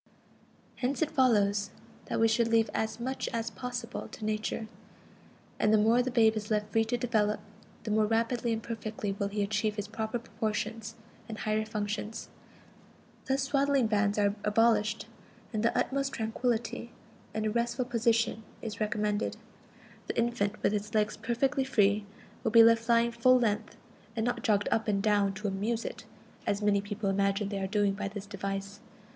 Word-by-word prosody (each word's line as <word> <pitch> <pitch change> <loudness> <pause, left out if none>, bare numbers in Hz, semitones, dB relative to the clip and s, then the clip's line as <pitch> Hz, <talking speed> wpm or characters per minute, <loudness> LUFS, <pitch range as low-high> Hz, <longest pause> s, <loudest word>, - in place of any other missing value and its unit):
Hence 265 +4 0
it 315 - -2
follows 205 -6 +3 0.4
that - - -2
we 225 - +5
should 225 +1 +2
leave 230 -1 +3
as 220 +1 -2
much 260 +3 -3
as 230 0 -2
possible 245 -1 -5
to 215 - -8
Nature; 215 +1 -2 0.9
and 215 - +3
the 220 - +6
more 225 +3 +4
the 250 - -1
babe 225 -3 +4
is 210 -1 -4
left 210 -1 0
free 225 +1 +3
to 240 +2 -1
develop, 220 -3 +1 0.4
the 215 - -3
more 215 0 +3
rapidly 230 +2 0
and 225 -1 -2
perfectly 215 -2 -4
will 200 0 -2
he 205 0 -1
achieve 215 +1 0
his 205 -1 -4
proper 220 +2 -3
proportions 225 -1 -3 0.3
and 220 - -5
higher 215 0 0
functions. 210 0 -4 1.0
Thus 270 0 +1
swaddling 275 -1 +2
bands 210 -1 +1
are 205 -1 +3
abolished, 215 0 +2 0.5
and 215 - 0
the 230 - +1
"utmost 275 0 0
tranquillity 235 +1 -2 0.5
in 215 0 -1
a 215 - +1
restful 240 +2 0
position" 230 -2 +1 0.2
is 215 -3 -5
recommended. 210 0 0 0.7
The - - -3
infant, 230 -3 0
with 200 - +3
its 210 +1 -3
legs 215 0 +2
perfectly 250 +5 0
free, 210 -5 +2 0.4
will - - +2
be 230 +1 +8
left 230 +1 +4
lying 235 0 +4
full 255 +2 +5
length, 220 -2 -1 0.4
and 220 -1 0
not 245 -1 -1
jogged 205 -3 +2
up 225 0 +1
and 200 -2 +2
down 205 -1 +2
to 210 +1 -3
"amuse" 215 +4 -1
it, - - -6 0.4
as 200 - +1
many 200 -1 +3
persons 205 +1 -7
imagine 200 +1 +1
they 200 -1 -3
are 190 - -1
doing 205 0 +2
by 200 0 -3
this 200 0 -6
device. 195 0 -5
220 Hz, 175 wpm, -30 LUFS, 210-235 Hz, 1.0 s, be